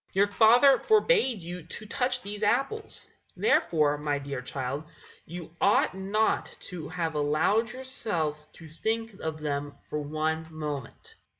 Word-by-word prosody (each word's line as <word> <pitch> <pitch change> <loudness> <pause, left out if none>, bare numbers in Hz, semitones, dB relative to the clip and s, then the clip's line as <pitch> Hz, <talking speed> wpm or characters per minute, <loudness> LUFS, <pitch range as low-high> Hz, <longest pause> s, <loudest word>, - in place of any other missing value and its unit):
Your 195 +1 +5
father 240 +6 +6
forbade 435 - +3
you 175 +2 -6
to 180 +7 -7
touch 250 +2 -1
these 205 +1 -6
apples; 275 - 0 0.3
therefore, 150 -3 +3
my 145 -1 0
dear 140 -2 -5
child, 135 +3 -4 0.4
you 170 0 -8
ought 200 - +4
not 200 +3 +1 0.2
to 165 -4 -6
have 165 -1 -2
allowed 155 +10 +2
yourself 175 - -2
to 165 - -12
think 225 +8 -2
of 160 -1 -4
them 145 -1 -3
for 150 - -4
one 155 +2 -2
moment. 150 -5 -6
170 Hz, 135 wpm, -28 LUFS, 150-220 Hz, 0.4 s, father